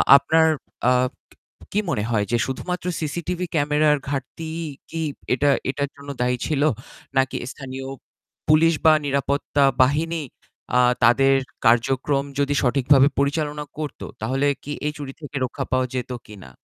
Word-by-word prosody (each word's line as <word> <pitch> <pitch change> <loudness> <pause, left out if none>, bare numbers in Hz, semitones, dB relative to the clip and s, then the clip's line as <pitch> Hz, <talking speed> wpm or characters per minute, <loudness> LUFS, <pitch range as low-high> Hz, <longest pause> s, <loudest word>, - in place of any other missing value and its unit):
আপনার 160 +4 +4 0.4
আ - - +6 0.8
কি 205 - +1
মনে 105 -8 0
হয় 110 -3 +1
যে 120 - +3
শুধুমাত্র 180 +7 -4
CCTV 170 +3 -3
ক্যামেরার 150 0 +3
ঘাটতিই 160 +3 -4 0.3
কি 165 - -4 0.3
এটা, 145 +3 +2 0.2
এটার 140 +1 -1
জন্য 140 0 -11
দায়ী 125 0 +1
ছিল? 150 -3 0 0.6
নাকি 135 -1 +2
স্থানীয় 135 -1 -7 0.6
পুলিশ 160 +2 +5
বা 160 - +8
নিরাপত্তা 140 +1 0 0.2
বাহিনী, 155 +5 +2 0.5
আ - - +5 0.2
তাদের 135 +4 +5 0.3
কার্যক্রম 130 +4 +3 0.2
যদি 140 0 +2
সঠিকভাবে 135 +1 +4
পরিচালনা 150 +1 0
করতো 155 -2 -5 0.2
তাহলে 135 +6 0 0.2
কি 145 - -6
এই 150 - +1
চুরি 140 -2 -6
থেকে 145 -1 -9
রক্ষা 130 +2 -4
পাওয়া 130 0 +2
যেত 125 0 -3 0.2
কিনা? 100 -10 -12
140 Hz, 135 wpm, -23 LUFS, 130-150 Hz, 0.8 s, বা